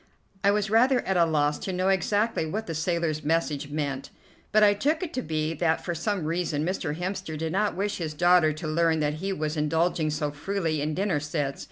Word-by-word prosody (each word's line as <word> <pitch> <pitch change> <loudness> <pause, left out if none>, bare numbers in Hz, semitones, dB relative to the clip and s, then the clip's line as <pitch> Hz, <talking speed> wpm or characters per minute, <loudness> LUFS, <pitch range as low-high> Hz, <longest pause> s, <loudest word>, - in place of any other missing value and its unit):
I 200 - +5
was 205 0 +1
rather 250 +3 +4
at 190 - -1
a 170 -1 +5
loss 150 -2 +1
to 190 - -4
know 185 +1 0
exactly 205 0 +1
what 215 +8 -3
the 165 - -4
sailor's 160 -1 -1
message 150 -2 0
meant, 145 -3 -3 0.4
but 215 0 +5
I 205 -1 +6
took 300 - 0
it 345 -2 -5
to 255 - -1
be 155 -4 -2
that 160 -1 0
for 175 - -1
some 175 +1 -2
reason 160 -2 -1
Mr. 175 -4 -2
Hemster 185 -3 -4
did 160 +1 -3
not 205 +3 0
wish 205 +1 -1
his 155 -3 -4
daughter 175 -1 +5
to 155 +1 -6
learn 165 0 +2
that 150 0 +1
he 195 +1 -1
was 155 -4 -2
indulging 160 +1 +1
so 150 -1 -1
freely 160 0 -2
in 150 +1 -1
dinner 190 -5 0
sets. 145 -2 -3
165 Hz, 215 wpm, -26 LUFS, 155-195 Hz, 0.4 s, I